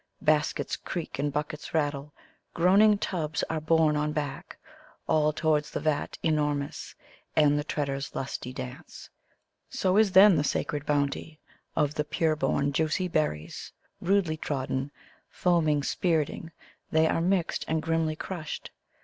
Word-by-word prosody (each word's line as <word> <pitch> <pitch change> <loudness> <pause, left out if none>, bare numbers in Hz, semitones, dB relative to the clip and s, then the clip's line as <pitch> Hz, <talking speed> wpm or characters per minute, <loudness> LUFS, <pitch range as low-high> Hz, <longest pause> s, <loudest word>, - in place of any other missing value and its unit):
Baskets 150 -1 +1
creftk 170 -6 -5
and 145 +1 0
buckiets 150 +2 -4
rattle, 145 -2 -1 0.4
gmaniitg 200 +5 +5
tubs 160 -4 -2
ar« 160 -1 -2
borne 155 -1 +3
on 150 0 0
back, 145 -3 -4 0.5
All 155 -1 +3
towards 155 -1 +1
the - - -3
vat 155 -1 -1
enormous 150 -1 -1 0.4
and 150 -2 +5
the - - -2
treaders' 140 -2 -3
lusty 130 -1 -4
dance; 130 0 -9 0.6
So 185 +1 +1
is 215 -3 +4
then 195 -2 +8
Uie 145 - 0
8aer«d 145 -1 -4
bounty 145 +2 -1 0.4
of 150 -2 +1
the 150 - -1
pure 155 +1 0
bom, 140 -2 0
juicy 160 +5 0
berries 80 - -2 0.3
Rudely 180 -4 +1
trodden; 135 -2 -2 0.4
foaming, 155 -5 +2
spirting, 165 0 -1 0.4
they 160 0 +3
are 165 - +1
mixed 180 0 0
and 160 0 +1
grimly 165 -1 0
crushed. 160 -1 -6
155 Hz, 135 wpm, -28 LUFS, 145-165 Hz, 0.6 s, then